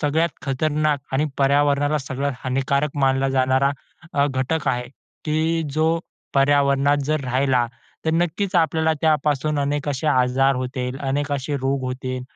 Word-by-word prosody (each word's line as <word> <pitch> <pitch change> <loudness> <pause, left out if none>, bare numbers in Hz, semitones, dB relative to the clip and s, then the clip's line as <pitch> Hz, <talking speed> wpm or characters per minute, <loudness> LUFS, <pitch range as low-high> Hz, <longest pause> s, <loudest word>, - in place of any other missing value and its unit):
सगळ्यात 160 +3 +2
खतरनाक 150 +1 0
आणि 135 +3 +2
पर्यावरणाला 145 +1 +2
सगळ्यात 140 0 -3
हानिकारक 135 +3 0
मानला 135 0 +2
जाणारा 130 +1 +2 0.4
अ, 140 0 +3
घटक 135 +3 -1
आहे, 125 0 0 0.4
की 160 +2 0
जो 160 +2 +2 0.4
पर्यावरणात 140 0 +3
जर 155 +1 0
राहिला, 130 -1 +1 0.4
तर 160 - +2
नक्कीच 175 +4 0
आपल्याला 160 -1 +2
त्यापासून 150 -1 +1
अनेक 145 +1 -1
असे 140 +2 -2
आजार 135 -1 +3
होतील, 125 0 -3
अनेक 140 +1 -1
असे 140 +1 -2
रोग 135 0 -1
होतील 130 0 -4
140 Hz, 135 wpm, -22 LUFS, 135-150 Hz, 0.4 s, अ